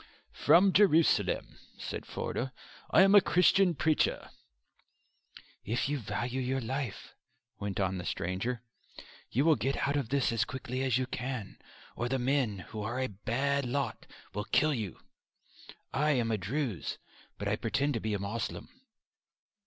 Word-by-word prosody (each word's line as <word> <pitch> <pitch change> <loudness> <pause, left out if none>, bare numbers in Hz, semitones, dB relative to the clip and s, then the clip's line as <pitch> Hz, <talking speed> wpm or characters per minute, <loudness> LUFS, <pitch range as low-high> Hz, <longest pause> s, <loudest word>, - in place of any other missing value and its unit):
"From 185 +2 +5
Jerusalem," 170 -5 +3 0.2
said - - -6
Forder. 130 +2 -3 0.4
"I - - +7
am 195 +1 +5
a 205 - +9
Christian 180 0 +4
preacher." 155 +2 +1 1.3
"If 120 +5 -1
you 145 0 -1
value 120 +4 -3
your 130 +1 0
life," 130 -3 -4 0.5
went 100 -1 -3
on 95 -1 0
the - - -5
stranger, 95 +7 -2 0.7
"you 135 +6 +1
will 160 -2 +6
get 135 +7 -1
out 140 - 0
of 135 -6 -2
this 140 -2 +2
as 115 -1 +2
quickly 130 +1 -4
as 130 -2 +2
you 130 - 0
can, 125 -4 -5 0.4
or 120 +1 -2
the 135 - +1
men, 125 -7 0
who 110 - -4
are 120 +4 -3
a 130 - -1
bad 135 +8 -1
lot, 140 +3 -2 0.3
will 105 +1 -3
kill 155 0 +3
you. 110 - -4 0.9
I 150 +2 +2
am 120 -4 +1
a 110 - +1
Druze 115 - -2 0.4
but - - -4
I - - +2
pretend 145 +1 0
to 115 - -1
be 110 -1 -1
a - - -2
Moslem." 105 +3 -4
130 Hz, 155 wpm, -31 LUFS, 110-140 Hz, 1.3 s, a